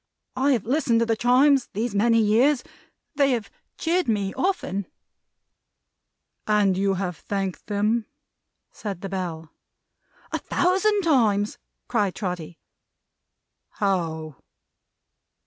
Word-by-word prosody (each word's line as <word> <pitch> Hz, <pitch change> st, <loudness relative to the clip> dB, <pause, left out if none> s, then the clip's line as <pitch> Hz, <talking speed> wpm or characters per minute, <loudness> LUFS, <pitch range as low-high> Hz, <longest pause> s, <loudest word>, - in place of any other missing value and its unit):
I 270 Hz, +2 st, +3 dB
have 230 Hz, -6 st, -1 dB
listened 250 Hz, -2 st, +2 dB
to -, -, +3 dB
the 225 Hz, -1 st, +1 dB
Chimes 255 Hz, +3 st, +4 dB
these 220 Hz, +2 st, -2 dB
many 230 Hz, +3 st, +3 dB
years. 240 Hz, +6 st, +3 dB, 0.5 s
They 280 Hz, -2 st, +3 dB
have 225 Hz, -4 st, -3 dB, 0.3 s
cheered 350 Hz, +2 st, 0 dB
me 200 Hz, -4 st, 0 dB
often." 200 Hz, -, -1 dB, 1.6 s
"And 205 Hz, -3 st, +3 dB
you 195 Hz, +1 st, +1 dB
have 180 Hz, -3 st, -3 dB
thanked 195 Hz, 0 st, -4 dB
them?" 215 Hz, +2 st, 0 dB, 0.6 s
said 195 Hz, -5 st, -6 dB
the 195 Hz, -, -5 dB
bell. 170 Hz, -4 st, -5 dB, 0.8 s
"A -, -, -1 dB
thousand 390 Hz, +3 st, +1 dB
times!" 215 Hz, -10 st, +2 dB, 0.3 s
cried 205 Hz, -6 st, 0 dB
Trotty. 180 Hz, -4 st, -5 dB, 1.2 s
"How?" 160 Hz, -7 st, -2 dB
210 Hz, 110 wpm, -24 LUFS, 195-255 Hz, 1.6 s, Chimes